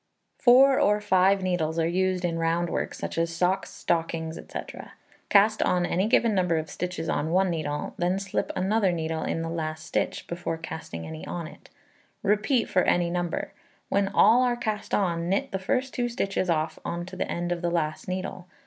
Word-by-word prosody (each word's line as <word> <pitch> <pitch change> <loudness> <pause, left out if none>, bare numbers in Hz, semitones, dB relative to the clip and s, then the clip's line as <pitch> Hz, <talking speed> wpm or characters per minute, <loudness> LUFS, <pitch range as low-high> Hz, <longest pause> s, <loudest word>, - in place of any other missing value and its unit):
Four 265 +2 +6
or 210 0 +3
five 195 -1 +3
needles 165 -3 0
are 165 -1 +2
used 185 +1 0
in 165 -1 -1
round 165 +1 0
work, - - -2
such - - -4
as 165 0 0
socks, 180 +3 0
stockings, 165 -1 -2
&c. - - -7 0.7
Cast 215 +2 +5
on 180 -1 +2
any 185 +4 +1
given 230 -1 +3
number 180 -4 +2
of 160 0 -4
stitches 180 -2 -4
on 155 - -1
one 185 +2 +2
needle, 155 -3 -3
then 180 +2 +1
slip 195 -1 -2
another 195 +1 +2
needle 160 -1 -2
in 165 - -2
the - - -3
last 155 -1 -4
stitch, - - -2
before 170 -1 -4
casting 160 - -7
any 80 0 -7
on 170 -2 -4
it; 155 - -13 0.5
repeat 210 +5 +2
for 185 - +2
any 175 -1 +2
number. 175 -1 -2 0.4
When 200 0 +2
all 225 +5 +5
are 245 -1 +2
cast 215 -3 -2
on, 170 -3 0
knit 235 +9 0
the 190 - -2
first 255 +7 -1
2 240 -1 -1
stitches 195 -5 -1
off 155 -1 0
on 170 0 -3
to 185 +1 -9
the 185 - -3
end 175 0 -2
of 175 -1 -1
the 175 - 0
last 155 -3 -2
needle. 185 -1 -4
180 Hz, 195 wpm, -26 LUFS, 165-195 Hz, 0.7 s, Four